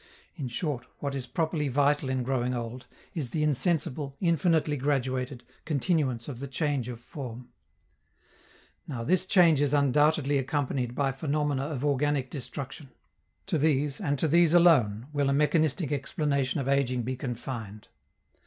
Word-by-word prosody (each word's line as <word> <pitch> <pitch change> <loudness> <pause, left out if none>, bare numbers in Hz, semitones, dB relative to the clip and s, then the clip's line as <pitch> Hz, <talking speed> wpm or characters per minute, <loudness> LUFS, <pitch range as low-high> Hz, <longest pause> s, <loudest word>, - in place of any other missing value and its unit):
In 140 - -4
short, 130 0 -3
what 140 -1 -3
is 130 -2 -4
properly 160 0 -1
vital 145 +1 +2
in 130 -1 0
growing 125 -1 0
old 120 +1 -6 0.3
is 145 -7 -3
the 150 +4 -1
insensible, 150 -2 0
infinitely 165 -3 +2
graduated, 130 -2 -1 0.2
continuance 140 -6 0
of 130 -5 -6
the 140 - -5
change 135 -3 -1
of 120 -2 -6
form. 125 -2 -8 1.4
Now, 125 -6 -4
this 185 +7 +2
change 170 -7 +5
is 145 0 +2
undoubtedly 145 +1 +3
accompanied 130 -3 -1
by 140 0 +1
phenomena 145 0 -1
of 145 -3 -3
organic 145 -1 +1
destruction: 135 +1 -6 0.6
to 160 - 0
these, 145 0 +1
and 145 -6 0
to 160 - +1
these 170 +2 +4
alone, 125 -11 +5
will 145 -1 +1
a - - +2
mechanistic 150 +1 +2
explanation 140 -1 0
of 135 - -3
ageing 130 -3 +1
be 130 +3 -2
confined. 120 -5 -6
140 Hz, 145 wpm, -28 LUFS, 130-150 Hz, 1.4 s, change